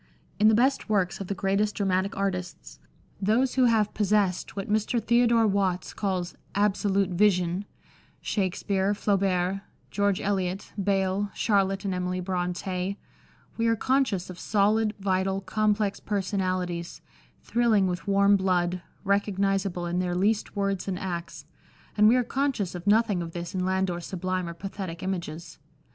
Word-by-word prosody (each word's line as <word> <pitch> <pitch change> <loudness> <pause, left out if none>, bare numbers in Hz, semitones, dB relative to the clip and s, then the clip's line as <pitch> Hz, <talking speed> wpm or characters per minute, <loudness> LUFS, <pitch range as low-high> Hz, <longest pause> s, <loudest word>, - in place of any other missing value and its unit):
In 215 - +6
the 220 - +6
best 260 +1 +2
works 195 -4 +1
of 195 - -5
the 200 - -2
greatest 200 +2 0
dramatic 195 -1 0
artists 180 - -4 0.2
— - - -31
those 250 +3 +2
who 260 -1 +4
have 220 -3 +2
possessed 205 -4 +1
what 195 -1 -4
Mr. 215 +3 +1
Theodore 235 0 +3
Watts 195 -3 0
calls 185 -3 -2
" - - -31
absolute 195 -1 +1
vision 180 0 +2 0.2
" - - -29
— - - -36
Shakspere, 195 0 0
Flaubert, 195 -2 +1 0.3
George 200 -2 +1
Eliot, 190 -1 -2
Beyle, 195 +1 +1
Charlotte 195 -2 +1
and 195 - 0
Emily 180 0 -2
Bronte 180 +1 -2 0.3
— - - -31
we 230 0 +1
are 230 - +3
conscious 230 -7 0
of 180 - -11
solid, 215 +1 +2
vital, 190 0 0
complex 205 +1 0
personalities, 185 -3 -2 0.4
thrilling 230 -4 +2
with 180 +2 -3
warm 200 0 +5
blood, 180 -2 +1 0.2
recog 200 0 +1
nisable 195 -3 0
in 175 +1 -1
their 180 -1 -1
least 205 +4 0
words 195 -2 -1
and 190 -2 -2
acts, 175 -3 -5 0.5
and 210 0 +5
we 230 - +6
are 250 - +3
conscious 260 -8 -1
of 180 +1 -7
nothing 210 -3 +3
of 165 -1 -6
this 170 -1 -5
in 185 -1 -1
Landor's 185 -2 -1
sublime 185 -1 -2
or 170 - -7
pathetic 190 -1 -6
images. 170 -3 -5
195 Hz, 155 wpm, -27 LUFS, 185-205 Hz, 0.5 s, In